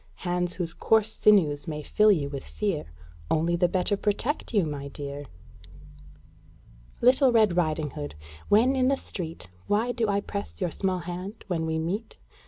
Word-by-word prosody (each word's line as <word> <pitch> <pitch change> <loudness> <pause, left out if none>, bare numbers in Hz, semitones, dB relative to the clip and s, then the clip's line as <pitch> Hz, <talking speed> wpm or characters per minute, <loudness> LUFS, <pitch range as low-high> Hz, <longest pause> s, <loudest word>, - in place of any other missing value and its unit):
Hands 175 0 0
whose 170 -2 -3
coarse 220 +5 +2
sinews 150 -9 +3
may 150 -1 -4
fill 210 +7 +4
you 155 -8 +1
with 140 -1 -6
fear 200 -8 -2 0.4
Only 165 +2 +2
the 175 +1 +3
better 185 +3 +1
protect 215 +8 -1
you, 205 -7 +3
my 145 -2 -5
dear! 140 0 -6 1.8
Little 255 +2 +5
Red 215 -6 +4
Riding 155 -4 0
Hood, 75 - -6 0.3
when 240 +6 +5
in 255 -1 +2
the 275 +1 +2
street, 165 - -6 0.2
Why 225 +4 +1
do 235 -2 0
I 200 0 +2
press 200 0 -6
your 180 -4 -1
small 185 0 -1
hand 180 +5 -6
when 165 -4 -2
we 160 0 -1
meet? 180 +8 -3
180 Hz, 165 wpm, -27 LUFS, 160-210 Hz, 1.8 s, Little